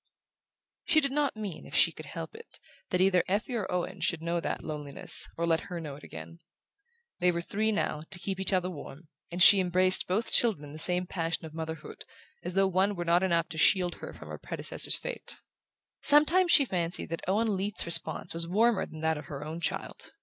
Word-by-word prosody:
She 310 - +3
did 275 -3 0
not 290 -2 0
mean, 205 -6 -6
if - - -8
she - - +5
could - - -11
help - - -7
it, 455 +1 -13 0.3
that 180 - 0
either 185 -2 +3
Effie 205 +6 -2
or 220 -5 -3
Owen 180 -1 -3
should 170 -2 -1
know 170 +1 -1
that - - -4
loneliness, 150 +4 +2
or 170 - -1
let 165 -1 +2
her 175 -1 -5
know 150 -4 -7
it 145 - -15
again. 80 +1 -10 0.8
They 180 0 +3
were 170 - -3
three, 215 +5 -1
now, 160 -7 -2
to 190 - -2
keep 190 +1 -5
each 190 - 0
other 185 -1 +1
warm, 150 0 -11 0.2
and 175 +1 +3
she 200 - +9
embraced 185 0 +4
both 210 +6 -1
children 220 -11 +2
in 145 - -11
the 155 - -9
same 180 +2 +1
passion 165 -2 -3
of 155 - -10
motherhood, 160 -1 -7 0.4
as 175 +1 -4
though 195 0 +4
one 190 +2 +1
were 175 -1 -4
not 170 +1 +3
enough 170 -3 +1
to 160 - -6
shield 180 +2 +3
her - - -8
from - - -13
her - - -8
predecessor's - - 0
fate. - - -7 0.6
Sometimes 330 +5 +4
she 280 - +6
fancied 175 -6 -2
that 165 - -4
Owen 210 +2 +1
Leath's 195 +2 -1
response 170 0 +2
was 165 0 -2
warmer 220 +4 +2
than 155 - -11
that 160 -1 0
of - - -10
her 145 0 -7
own 160 +2 -6
child. - - -5
180 Hz, 215 wpm, -28 LUFS, 165-195 Hz, 0.8 s, she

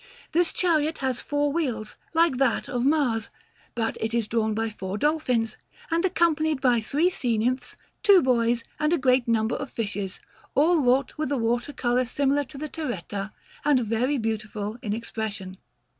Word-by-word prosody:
This 345 +1 +2
chariot 320 -3 +1
has 260 -2 -1
four 290 0 0
wheels, 250 -10 -2 0.2
like 325 -5 +4
that 260 -3 +1
of 245 -3 -2
Mars, 265 -6 +1 0.5
but 225 -1 -1
it 220 +1 -1
is 230 -3 +1
drawn 220 -1 0
by 225 0 -1
four 190 -1 -5
dolphins, 250 -5 0 0.3
and 335 +1 +2
accompanied 315 -5 +2
by 245 -3 +3
three 295 +10 +1
sea 245 -10 0
nymphs, 250 +3 -1 0.3
two 400 -2 +7
boys, 235 -2 +2 0.2
and 300 +1 +1
a - - +4
great 255 -3 +3
number 225 0 +1
of 280 - -5
fishes, 205 -4 -4 0.4
all 330 +5 +4
wrought 260 +3 +2
with 305 -3 -1
a 280 - +1
water 240 +3 0
colour 250 -2 +1
similar 280 +3 +1
to 275 +2 -11
the 305 +2 -4
terretta, 210 - -4 0.3
and 285 -3 +4
very 240 +5 0
beautiful 215 -1 -3
in 215 -6 -3
expression. 210 -4 -4
250 Hz, 170 wpm, -26 LUFS, 225-295 Hz, 0.5 s, two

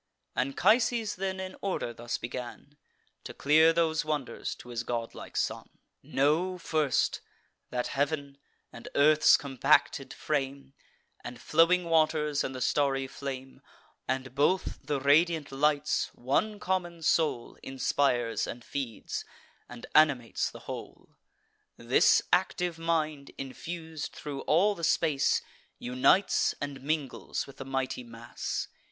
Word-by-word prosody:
Anchises 215 - +2
then, 190 0 -2
in 185 0 -6
order, 185 -11 -2
thus 120 +1 -4
begun 125 +4 -7 0.5
To - - -8
clear 155 +3 +5
those 165 -1 +1
wonders 150 -4 -3
to 125 - -13
his 120 -1 -3
godlike 120 -1 -5
son: - - -2 0.3
"Know, 160 +7 +1
first, 155 -5 0 0.5
that 125 -1 -2
heav'n, 140 -1 -2 0.3
and - - -9
earth's 150 +2 +6
compacted 140 -4 +2
frame, 140 -2 -3 0.5
And 120 0 -8
flowing 170 +6 +4
waters, 155 -3 +2
and 130 - -4
the 130 - -6
starry 135 0 +1
flame, 135 -1 -7 0.5
And 130 -1 -2
both 150 +7 +1
the 145 0 -1
radiant 155 +2 +3
lights, 145 +1 +1
one 205 - 0
common 175 -4 -2
soul 155 -7 +1
Inspires 130 -3 0
and 120 0 -7
feeds, 130 -6 -4 0.5
and 120 -1 -9
animates 140 -7 +3
the - - -12
whole. - - -8 0.7
This 120 +2 +4
active 180 -2 +1
mind, 155 -4 -1
infus'd 160 +3 -6
thro' 145 -2 -6
all 185 +7 +4
the 170 - -10
space, 155 -4 +2 0.3
Unites 125 +10 +2
and 140 -2 -5
mingles 145 -2 -2
with 140 0 -14
the 135 - -7
mighty 135 -1 -2
mass. 115 0 -5
145 Hz, 120 wpm, -29 LUFS, 130-165 Hz, 0.7 s, earth's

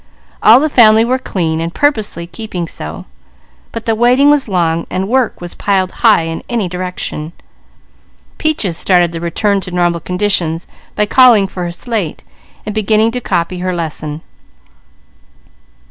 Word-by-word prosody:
All 225 +4 +7
the 305 - +1
family 225 -5 +5
were 255 +2 0
clean 165 -8 -2
and 165 +1 -3
purposely 215 - 0
keeping 180 -2 -6
so; 80 - -7 0.7
but 230 -1 -6
the 225 - +1
waiting 250 +5 +4
was 290 -3 +2
long, 170 -4 0
while 185 +1 -2
work 245 +2 0
was 175 0 -7
piled 190 -2 0
high 220 -8 +5
in 165 0 -4
any 230 -6 -1
direction. 180 -3 -5 1.1
Peaches 255 - -1
started 175 -2 +2
the 165 -1 -6
return 200 +4 0
to 185 - -8
normal 175 -1 0
conditions 180 -3 -1 0.3
by 210 - +2
calling 235 -3 +5
for 185 -2 -5
her 175 - -3
slate, 195 -2 -4 0.4
and 210 - -4
beginning 215 +1 +2
to 250 +1 -4
copy 180 -3 -2
her 185 0 -2
lesson. 155 -2 -4
190 Hz, 150 wpm, -14 LUFS, 170-225 Hz, 1.1 s, All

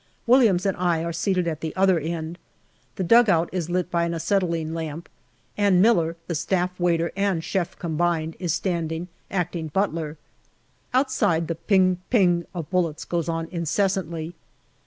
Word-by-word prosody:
Williams 230 -7 +4
and 195 - +1
I 175 -2 +1
are 170 0 -3
seated 180 +1 0
at 160 -2 -3
the 160 -1 -4
other 190 -2 +3
end. 165 +2 -4 0.6
The 190 - -2
dugout 195 -5 +4
is 175 -3 -3
lit 180 0 -1
by 170 -1 +1
an 170 0 -2
acetylene 165 -3 0
lamp, 160 0 -5 0.5
and 200 -3 +3
Miller, 175 -6 +3
the 170 - -3
Staff 180 +3 -1
waiter 170 -1 +1
and 195 -4 0
chef 180 -1 -2
combined, 165 -1 -1
is 175 -3 -1
standing, 170 0 -2 0.2
acting 175 -3 -2
butler. 160 -3 -2 0.7
Outside 255 - +1
the 165 - -1
"ping 185 +2 +2
ping" 175 -7 +3
of 170 -5 -5
bullets 170 -4 0
goes 170 -1 -2
on 165 0 -2
incessantly. 170 -1 -1
175 Hz, 155 wpm, -24 LUFS, 165-185 Hz, 0.7 s, Williams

